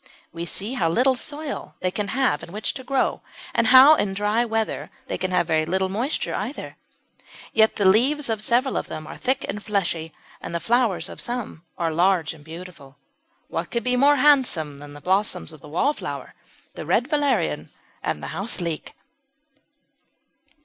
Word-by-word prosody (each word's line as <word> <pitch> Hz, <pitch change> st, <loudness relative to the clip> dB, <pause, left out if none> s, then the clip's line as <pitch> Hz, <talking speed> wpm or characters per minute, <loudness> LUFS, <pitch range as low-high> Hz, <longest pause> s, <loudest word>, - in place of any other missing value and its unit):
We 170 Hz, 0 st, -4 dB
see 205 Hz, +7 st, -2 dB
how 175 Hz, -10 st, +1 dB
little 255 Hz, +9 st, +3 dB
soil 295 Hz, +3 st, -5 dB
they 185 Hz, -, -1 dB
can 205 Hz, +1 st, -2 dB
have 255 Hz, -, +1 dB
in -, -, -10 dB
which 210 Hz, +3 st, -2 dB
to 260 Hz, -, -7 dB
grow, 270 Hz, +1 st, 0 dB, 0.3 s
and 230 Hz, -, +2 dB
how, 260 Hz, +5 st, +9 dB
in 200 Hz, -10 st, 0 dB
dry 210 Hz, +3 st, +1 dB
weather, 225 Hz, -2 st, -2 dB, 0.2 s
they -, -, -3 dB
can 185 Hz, -, -1 dB
have 180 Hz, -2 st, +2 dB
very 160 Hz, -1 st, +2 dB
little 190 Hz, +3 st, 0 dB
moisture 235 Hz, +10 st, -1 dB
either. -, -, -5 dB, 0.8 s
Yet 220 Hz, 0 st, +4 dB
the 205 Hz, -, 0 dB
leaves 265 Hz, +10 st, +4 dB
of 220 Hz, -2 st, -1 dB
several 245 Hz, +5 st, +1 dB
of -, -, -3 dB
them 155 Hz, -, -6 dB
are -, -, -8 dB
thick 265 Hz, +1 st, -1 dB
and 210 Hz, +1 st, -5 dB
fleshy, 170 Hz, -6 st, -1 dB, 0.3 s
and 170 Hz, -, -6 dB
the -, -, 0 dB
flowers 210 Hz, -4 st, +1 dB
of -, -, -7 dB
some 240 Hz, -9 st, -4 dB
are 165 Hz, -2 st, -1 dB
large 175 Hz, -1 st, +2 dB
and 155 Hz, -3 st, -15 dB
beautiful. 160 Hz, -4 st, -11 dB, 0.5 s
What -, -, -4 dB
could 235 Hz, -2 st, -2 dB
be 250 Hz, +2 st, +1 dB
more 280 Hz, +3 st, +5 dB
handsome 255 Hz, -, +3 dB
than 145 Hz, 0 st, -10 dB
the 145 Hz, -, -11 dB
blossoms 185 Hz, -1 st, 0 dB
of 155 Hz, -, -14 dB
the 150 Hz, -, -12 dB
Wallflower, 275 Hz, -, -2 dB, 0.4 s
the -, -, -7 dB
Red 245 Hz, -, +2 dB
Valerian, 275 Hz, -, 0 dB, 0.3 s
and 75 Hz, -, -3 dB
the -, -, -4 dB
Houseleek? 170 Hz, -2 st, -3 dB
205 Hz, 175 wpm, -24 LUFS, 170-250 Hz, 0.8 s, how